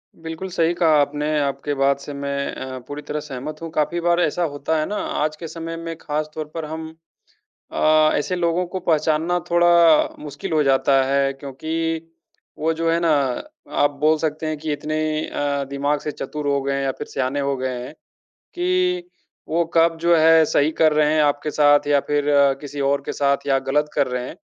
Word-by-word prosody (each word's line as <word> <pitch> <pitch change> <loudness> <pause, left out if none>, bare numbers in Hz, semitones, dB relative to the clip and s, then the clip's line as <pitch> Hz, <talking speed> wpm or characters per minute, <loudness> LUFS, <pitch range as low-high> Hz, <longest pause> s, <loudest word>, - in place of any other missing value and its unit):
बिल्कुल, 165 +3 -7
सही 170 -1 +1
कहा 160 -3 +3
आपने, 150 +1 0
आपकी 140 +1 -2
बात 140 0 +2
से 145 +1 -8
मैं 140 0 -3
अ, 130 0 -6
पूरी 145 +1 -6
तरह 150 +1 -4
सहमत 150 +2 -7
हूँ। 165 - -5
काफ़ी 160 +3 0
बार 175 0 +2
ऐसा 175 +3 0
होता 150 +3 -1
है 155 - 0
ना, 210 - -4
आज 155 -5 -2
के 165 +1 -8
समय 165 +1 -6
में 165 0 -6
ख़ास 150 -1 -3
तौर 155 -1 -4
पर 165 -2 -3
हम 160 +1 -6 0.8
अ, 155 0 +4
ऐसे 165 +5 -1
लोगों 170 +1 +1
को 185 +2 -5
पहचानना 160 +2 +1
थोड़ा 170 -2 +5
मुश्किल 150 +5 -7
हो 155 -1 +3
जाता 135 0 +3
है। 140 0 +1
क्योंकि 135 +3 -7 0.9
वो 160 +1 +1
जो 165 +1 0
है 165 - +2
ना 170 -1 +2 0.7
आप 145 - +4
बोल 155 +1 +4
सकते 155 0 -2
हैं 155 0 -2
कि 155 0 -3
इतने 155 +1 -2 0.3
अ, 140 -1 -2
दिमाग़ 145 +1 0
से 150 - -4
चतुर 150 +2 -5
हो 140 -1 +1
गए 140 0 -1
हैं 140 - -1
या 135 - 0
फ़िर - - -5
सयाने 135 +2 -2
हो 140 -1 -1
गए 130 0 -3
हैं 125 - -8 0.6
कि 360 0 +1 0.4
वो 170 +2 +1
कब 165 0 +3
जो 170 0 +4
है 160 0 +6
सही 145 +1 +2
कर 155 -1 +5
रहे 150 0 +3
हैं 155 - +3
आपके 145 +1 0
साथ 145 -1 +4
या 145 -1 +4
फ़िर 145 0 +1 0.4
किसी 145 0 -7
और 140 - +1
के - - -3
साथ 140 0 0
या 135 -1 +3
ग़लत 150 +2 +1
कर 140 -2 +2
रहे 125 0 -3
हैं - - -8
150 Hz, 205 wpm, -21 LUFS, 140-165 Hz, 0.9 s, है